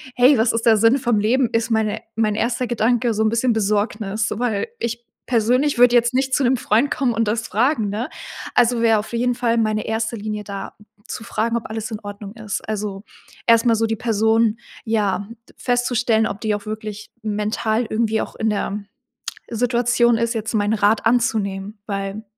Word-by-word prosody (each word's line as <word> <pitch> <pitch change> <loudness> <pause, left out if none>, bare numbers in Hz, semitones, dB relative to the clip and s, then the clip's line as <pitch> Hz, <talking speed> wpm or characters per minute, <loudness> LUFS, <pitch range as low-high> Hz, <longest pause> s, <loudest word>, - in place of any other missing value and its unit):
„Hey, 250 +2 +5
was 225 +1 +3
ist 230 0 -1
der 225 -2 +6
Sinne 230 +5 +4
vom 240 -5 +1
Leben?“, 240 +4 +2
ist 230 +1 +1
meine 220 -1 0
mein 215 -2 +1
1. 235 +3 0
Gedanke 240 0 +1
so 215 - -1
'n 220 - +3
bisschen 230 +1 +1
Besorgnis, 210 0 0
weil 230 -4 -1
ich 235 0 -3 0.2
persönlich 250 +4 +2
würde 245 0 +6
jetzt 240 +1 +3
nicht 265 0 0
zu 280 - +1
'nem 255 +1 +3
Freund 230 +5 +2
kommen 255 -4 +1
und 225 0 0
das 225 +2 -1
fragen, 225 0 +1
ne? 215 +5 -3 0.5
Also, 240 -1 +3
wäre 225 -1 +4
auf 210 - -7
jeden 245 +1 +1
Fall 235 -1 +1
meine 215 -1 0
1. 225 +1 -1
Linie 210 0 -4
da 200 -1 -7 0.3
zu - - -6
fragen, 230 0 -1
ob 230 - -6
alles 220 0 -4
in 215 - -4
Ordnung 205 0 -8
ist. 220 -3 -4
Also, 205 -2 -4 0.4
erst 230 +1 +5
mal 230 - +4
so 225 +1 +1
die 225 - -1
Person 225 0 +2 0.3
ja, 205 -3 0 0.3
festzustellen, 240 -2 +1
ob 200 - -6
die 215 -2 0
auch 205 0 -7
wirklich 215 -1 -6
mental 215 +2 -1
irgendwie 220 0 0
auch - - -6
in 220 - 0
der 205 0 -2 0.7
Situation 240 0 +2
ist, 230 +1 0
jetzt 220 0 -3
meinen 205 0 +1
Rat 210 +1 +2
anzunehmen, 215 -4 0
weil 195 +1 -4
225 Hz, 190 wpm, -21 LUFS, 215-235 Hz, 0.7 s, der